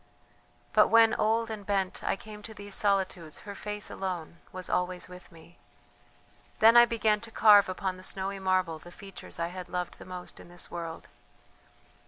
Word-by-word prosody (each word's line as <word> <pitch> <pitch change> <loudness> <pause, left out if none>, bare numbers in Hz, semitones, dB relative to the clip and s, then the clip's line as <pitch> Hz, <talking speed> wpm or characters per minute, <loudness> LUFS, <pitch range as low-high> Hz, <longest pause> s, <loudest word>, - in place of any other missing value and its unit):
"But - - +6
when, 225 0 +6
old 225 +1 +1
and 215 -2 -6
bent, 195 -2 -1
I - - +1
came 210 +1 -11
to 220 +1 -9
these 205 -1 -8
solitudes 190 -6 0
her 200 - -6
face 210 0 -6
alone 175 -3 -5
was 185 -1 -7
always 180 -1 -1
with 180 0 -13
me. 170 +1 -17 1.0
Then 225 +2 +7
I 240 0 +10
began 220 -3 +1
to 230 - -9
carve 205 -3 +6
upon 185 0 -3
the - - -12
snowy 195 +1 -4
marble 185 -4 0
the 175 - -13
features 195 0 -10
I 170 0 -2
had 180 0 -8
loved 180 -1 -4
the - - -10
most 180 -1 -9
in - - -13
this 175 0 -8
world. 165 -1 -6
190 Hz, 180 wpm, -29 LUFS, 180-210 Hz, 1.0 s, I